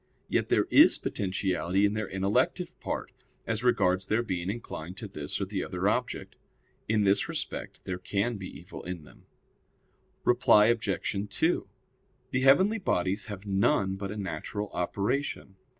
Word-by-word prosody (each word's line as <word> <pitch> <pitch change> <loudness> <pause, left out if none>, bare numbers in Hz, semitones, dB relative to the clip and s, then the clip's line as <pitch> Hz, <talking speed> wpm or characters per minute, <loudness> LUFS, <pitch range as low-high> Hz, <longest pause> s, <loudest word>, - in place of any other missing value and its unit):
Yet - - 0
there - - +3
is - - +7
potentiality 95 0 0
in 100 - +2
their 110 -1 -2
intellective 95 +2 0
part, - - -4 0.3
as 110 0 -2
regards 95 -6 +2
their 110 +2 +2
being 90 -4 -3
inclined 95 -5 -6
to 110 - -5
this 75 -7 -3
or - - -1
the - - -3
other - - -2
object. - - -1 0.5
In 110 -1 +3
this 100 0 +2
respect - - -3
there 90 -1 -3
can 100 +5 -1
be 95 -1 -6
evil 85 +5 -10
in 90 -3 -6
them. 65 - -18 1.0
Reply 120 -3 +5
Obj. 110 -3 -2
2: 165 +2 +1 0.6
The 130 - +1
heavenly 185 +12 +5
bodies 95 - 0
have 100 -1 -8
none 95 -1 +2
but 100 0 -5
a 105 - -5
natural 100 +2 -4
operation. 100 +4 -2
100 Hz, 150 wpm, -29 LUFS, 95-110 Hz, 1.0 s, is